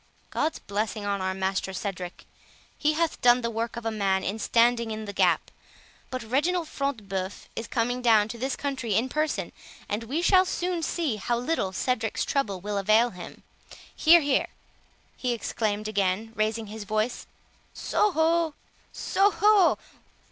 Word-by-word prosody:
God's 315 +2 0
blessing 210 +1 -3
on 200 -1 -1
our 190 0 -1
master 190 0 -1
Cedric, 185 -2 -5 0.5
he 305 +1 +1
hath 325 +1 -1
done 245 -1 +5
the 235 -1 -2
work 230 +1 -3
of 235 - -6
a 225 - 0
man 195 -3 0
in 205 +3 -3
standing 235 +1 +3
in 215 0 -4
the 200 - -6
gap; - - +2 0.6
but 255 -1 -4
Reginald 310 +9 0
Front 280 -3 -2
de 215 - -14
Bœuf 190 0 -4
is 225 - -4
coming 245 +2 -1
down 220 -4 +5
to 235 0 -7
this 265 +2 -1
country 260 -7 -2
in 240 +5 +1
person, 305 +3 -1 0.4
and 215 +3 -3
we 295 +9 -2
shall 370 0 +6
soon 360 -1 -2
see 315 -7 -1
how 235 +4 -1
little 245 -6 -1
Cedric's 225 +2 -1
trouble 210 -9 -1
will 205 +2 -2
avail 215 +4 +4
him.—Here, 315 - 0
here," 285 -2 +1 0.7
he 250 -1 -1
exclaimed 215 -2 -2
again, 200 +1 0
raising 220 +1 -1
his 215 +1 -7
voice, 215 +4 -2 0.4
"So 420 - +1
ho! 325 -1 +2 0.4
so 395 +1 +2
ho! 415 -3 +4
230 Hz, 160 wpm, -27 LUFS, 205-285 Hz, 0.7 s, shall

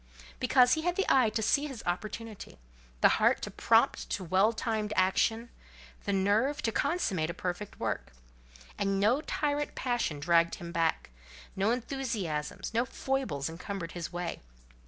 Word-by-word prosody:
Because 250 -1 +5
he 315 - +1
had 350 +2 0
the 390 - +1
eye 255 -4 +5
to 220 +1 -2
see 285 +7 +2
his 260 -6 -8
opportunity, 210 - -5 0.4
the - - +8
heart - - +4
to - - -4
prompt - - +2
to - - -2
well 190 +5 +3
timed 220 -2 -2
action, 225 +5 +1 0.5
the - - 0
nerve 215 +10 +1
to 225 - +1
consummate 195 - 0
a 170 - -4
perfect 185 +3 -5
work. - - -3 0.7
And 195 -1 +1
no 230 +8 +3
tyrant 295 -1 -1
passion 240 - -1
dragged 170 +2 +3
him 170 -1 -8
back; 165 - 0 0.4
no 195 +3 +1
enthusiasms, 230 - -3
no 230 +1 +3
foibles 255 - -2
encumbered 170 +1 -5
his 175 -1 -5
way. 175 -1 -4
210 Hz, 155 wpm, -30 LUFS, 175-250 Hz, 0.7 s, the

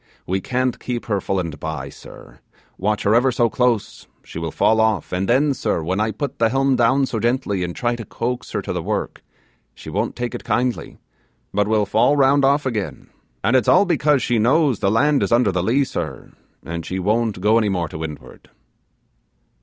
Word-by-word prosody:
We 95 +1 -1
can't 130 +1 -1
keep 120 -1 -4
her 100 -4 -1
full 95 - -1
and 80 -5 -5
bye, 80 0 -5
sir; - - -14 0.4
watch 105 +2 -1
her 100 - +3
ever 125 +3 +4
so 120 -2 +1
close, 125 -4 -1 0.2
she - - -8
will 80 0 -3
fall 110 +7 +2
off 110 -6 0
and 95 +3 -1
then, 140 +4 +3
sir, 85 - -2
when 95 +5 -1
I 110 +1 +1
put 140 +6 -5
the 115 -1 +3
helm 135 +2 +2
down 130 +3 +3
so 115 -3 -3
gently, 120 -5 0
and 85 -1 -4
try 120 -1 0
like 120 - -3
to 115 - -6
coax 120 +4 -4
her - - -2
to - - -4
the - - -2
work, - - -3 0.5
she 80 - -10
won't 105 +6 -2
take 120 -1 -4
it - - -6
kindly, 125 0 -1 0.6
but 105 +1 +1
will 110 -1 +2
fall 125 +8 +2
round 140 0 +4
off 140 +2 +3
again; 110 -6 -4 0.3
and 115 - +2
it's 125 -4 +3
all 205 - +5
because 150 -6 +2
she 120 -2 +1
knows 135 - +3
the 95 - +1
land 140 +7 +3
is - - -1
under 120 -3 +3
the 90 -1 -1
lee, 120 +9 +2
sir, - - -5 0.3
and 85 0 -5
she 95 - -4
won't 105 +2 0
go 105 +4 +3
any 105 -2 +1
more 90 -3 -1
to 75 - -8
windward. 80 -2 -9
115 Hz, 210 wpm, -21 LUFS, 95-130 Hz, 0.6 s, all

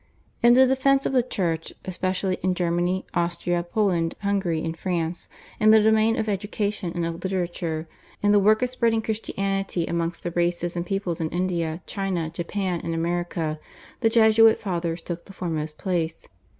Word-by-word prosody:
In 240 0 +7
the 260 +1 +7
defence 270 +1 +3
of - - 0
the 255 - +5
Church, 170 -9 -2
especially 185 0 -1
in 185 0 +1
Germany, 175 +1 0
Austria, 175 0 0
Poland, 175 -3 0
Hungary, 190 -5 0
and 165 0 -3
France, 170 -1 -3 0.3
in 215 - +5
the 220 0 +8
domain 220 +1 +3
of 220 - -1
education 205 -2 -2
and 170 -1 -1
of 165 0 -4
literature, 175 -4 -2 0.4
in 205 - +4
the 205 - +6
work 215 +4 +4
of 250 - 0
spreading 230 -3 +1
Christianity 195 -4 -2
amongst 170 0 -2
the 175 - -2
races 175 0 0
and 175 0 -3
peoples 190 -4 -2
in 160 - -1
India, 170 -2 -2
China, 185 -5 -2
Japan, 175 +1 -2
and 165 - -2
America, 165 -2 -2 0.4
the 225 - +3
Jesuit 225 -1 +6
Fathers 170 -4 -3
took 170 -1 -6
the 195 - -12
foremost 155 -4 -4
place. 170 -4 -2
180 Hz, 165 wpm, -25 LUFS, 170-210 Hz, 0.4 s, the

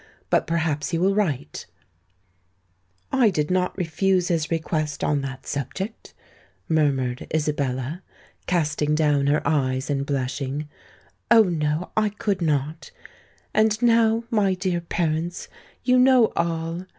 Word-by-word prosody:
But - - +2
perhaps 160 -3 -1
he 170 - -1
will 190 +4 +2
write——" 155 -10 -2 1.4
"I 255 -5 +4
did 155 -3 -1
not 180 0 0
refuse 180 +1 +1
his 160 -3 0
request 155 -2 -2
on 145 -1 +1
that 135 -1 -7
subject," 190 - -5 0.5
murmured 135 -6 0
Isabella, 145 0 -2 0.5
casting 150 -3 +1
down 145 -3 +2
her 145 +2 +2
eyes 130 -3 0
and 140 -1 0
blushing: 140 +1 -3 0.6
"Oh! 230 -2 +7
no—I 170 +4 -1
could 205 -2 -2
not! 155 0 -1 0.6
And 215 0 +3
now, 230 -1 +3
my 200 -4 +2
dear 180 -2 -1
parents, 170 0 -2 0.4
you 255 0 +4
know 255 -3 +5
all. 170 +1 -2
160 Hz, 120 wpm, -24 LUFS, 145-190 Hz, 1.4 s, Oh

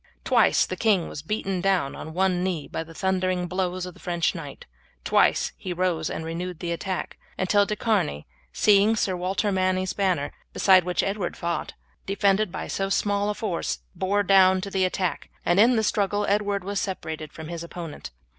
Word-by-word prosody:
Twice - - +4
the - - -4
king 205 -7 +2
was 145 - -6
beaten 195 +1 -2
down 190 -7 +1
on 160 +1 -8
one 185 -1 +2
knee 175 -6 -2
by 160 - -4
the 165 0 -14
thundering 185 -1 0
blows 185 0 -2
of 180 - -8
the - - -18
French 170 -2 0
knight, 150 -6 -8 0.4
twice - - +3
he 185 - -4
rose 175 -3 0
and 160 - -4
renewed 175 +2 -4
the 170 0 -4
attack, 185 +2 -4 0.2
until 200 +2 +3
De 210 - -1
Charny, 195 - 0 0.3
seeing 210 - +4
Sir 190 -4 0
Walter 190 +3 -1
Manny's 185 -1 0
banner, 185 -8 0 0.2
beside 185 -3 +5
which 180 0 0
Edward 195 -2 -2
fought, 170 0 -3 0.3
defended 200 0 +2
by - - -5
so 195 0 -2
small 205 +1 +1
a 210 - -1
force, 175 - -2
also - - -33
bore 200 +2 0
down 190 -1 +5
to 200 +1 -6
the 190 -1 +2
attack, 185 -1 -2 0.2
and 175 +2 +3
in 240 +4 +6
the 220 - +2
struggle 205 0 +1
Edward 205 -1 0
was 200 +1 -2
separated 160 -5 -4
from 160 0 -9
his 170 -1 -5
opponent. 170 -2 -7
185 Hz, 190 wpm, -25 LUFS, 175-200 Hz, 0.4 s, in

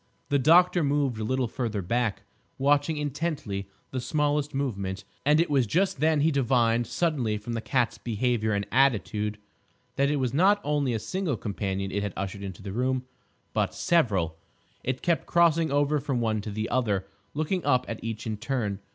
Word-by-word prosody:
The 140 - +3
doctor 175 +4 +5
moved 140 -5 +1
a - - -2
little 130 +2 0
farther 110 -5 -3
back, 110 +1 -1 0.3
watching 145 +3 +2
intently 145 - -3 0.2
the 130 - -2
smallest 150 +1 0
movement, 100 -9 -3 0.2
and 150 +1 +5
it 170 - +3
was 135 -5 +2
just 180 - +1
then 155 0 +3
he 160 +2 +3
divined 120 -4 +2
suddenly 130 -8 0
from 110 +3 -6
the 115 - -2
cat's 125 -1 0
behaviour 115 -1 0
and 100 0 0
attitude 105 -5 +2 0.6
that 140 +1 +3
it 150 - +1
was 130 -3 -1
not 195 +7 +4
only 145 -5 0
a - - +1
single 170 - -2
companion 100 -2 -3
it 100 +2 -1
had 100 -2 -3
ushered 95 +1 -4
into 100 0 -7
the 100 - -5
room, 130 +4 0 0.5
but - - 0
several. 100 - +1 0.5
It 130 0 -2
kept 170 -2 +1
crossing 165 -1 +3
over 145 +1 +2
from 135 -3 -1
one 110 -2 0
to 105 - -6
the 110 +2 -3
other, 105 -6 0 0.3
looking 160 +4 -1
up 125 0 +2
at 115 - -6
each 115 0 -4
in 110 -2 -3
turn. 110 -4 -2
125 Hz, 180 wpm, -27 LUFS, 105-145 Hz, 0.6 s, doctor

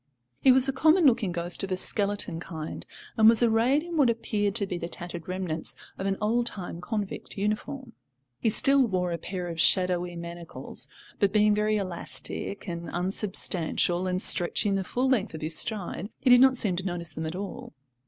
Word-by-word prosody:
He 265 - +6
was 260 +1 +5
a 270 - 0
common 315 +5 +4
looking 225 -8 +3
ghost 175 +1 -2
of 195 - -4
a 185 - 0
skeleton 200 -4 +1
kind, 160 -3 -7 0.3
and 220 0 +7
was 230 +1 +5
arrayed 235 +6 +3
in 340 -1 -5
what 275 -5 +4
appeared 210 -3 -1
to 215 -4 +1
be 180 -2 -4
the 170 - -4
tattered 170 -1 -7
remnants 180 -3 -3 0.2
of 190 - -4
an 195 0 -1
old 235 +3 +1
time 175 -5 -5
convict 210 +1 -5
uniform. 230 +5 -3 0.5
He 225 - +1
still 275 +5 +4
wore 180 -3 -1
a 170 - -3
pair 180 -2 -5
of 165 -1 -2
shadowy 180 +1 +2
manacles, 170 0 -4 0.3
but, 200 -2 +2
being 210 0 +4
very 210 +1 +1
elastic 195 +2 -3
and 170 -1 -5
unsubstantial 180 -1 0
and 185 0 -1
stretching 195 +3 +3
the 195 -1 0
full 250 +7 -1
length 250 -10 0
of 155 - -8
his 155 +1 -1
stride, 200 -2 -2
he 255 - +3
did 245 0 +8
not 260 -1 +5
seem 195 -6 +1
to 185 - -3
notice 175 -4 -3
them 160 +1 -4
at 160 - -5
all. 195 -3 -7
195 Hz, 195 wpm, -27 LUFS, 175-225 Hz, 0.5 s, did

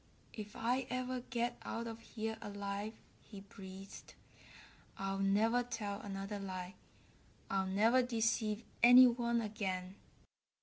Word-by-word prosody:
"If 210 0 -7
I 245 +3 0
ever 255 0 -2
get 240 0 -1
out 230 - -4
of 225 -1 -6
here 220 -1 -4
alive," 200 +1 -4 0.3
he 200 -3 -11
breathed, 195 0 -11 0.8
"I'll 195 0 -2
never 215 +5 +3
tell 220 -4 -4
another 200 0 -4
lie. 185 -2 -5 0.8
I'll 195 -1 +1
never 220 +7 +4
deceive 225 -2 0 0.2
any 245 +2 +10
one 235 -1 +2
again." 190 -4 -3
215 Hz, 120 wpm, -36 LUFS, 195-235 Hz, 0.8 s, any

